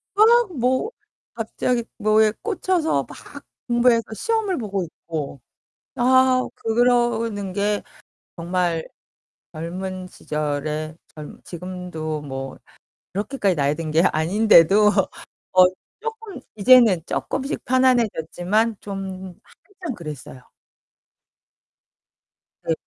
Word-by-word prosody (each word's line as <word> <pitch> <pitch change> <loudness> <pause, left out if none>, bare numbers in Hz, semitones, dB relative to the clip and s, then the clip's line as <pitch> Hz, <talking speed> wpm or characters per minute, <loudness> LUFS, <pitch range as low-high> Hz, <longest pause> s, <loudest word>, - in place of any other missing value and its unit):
막 450 -1 +5
뭐 260 - +1 0.4
갑자기 235 +1 -1
뭐에 215 0 +3
꽂혀서 370 -6 0
막 - - -12 0.2
공부해서 240 -1 +3
시험을 440 - -1
보고 200 -5 -2
있고 155 -5 -6 0.5
아 255 +1 +4
그러는 230 -4 +1
게 205 +1 0 0.5
정말 175 -1 -1 0.6
젊은 185 +3 -5
시절에 150 0 -3 0.2
젊 150 -1 -10
지금도 175 -4 -5
뭐 135 -1 -6 0.5
그렇게까지 200 - -1
나이 140 +1 +1
든 160 -1 -5
게 160 +2 +3
아닌데도 195 +3 +5 0.6
어 185 0 +7 0.4
쪼끔 450 - -6
이제는 220 -4 +6
쪼끔씩 270 +2 -3
편안해졌지만 225 -4 +1
좀 190 -2 -6
한참 370 -9 -9
그랬어요. 150 - -9 2.2
네. 165 - +1
205 Hz, 195 characters per minute, -22 LUFS, 165-250 Hz, 2.2 s, 어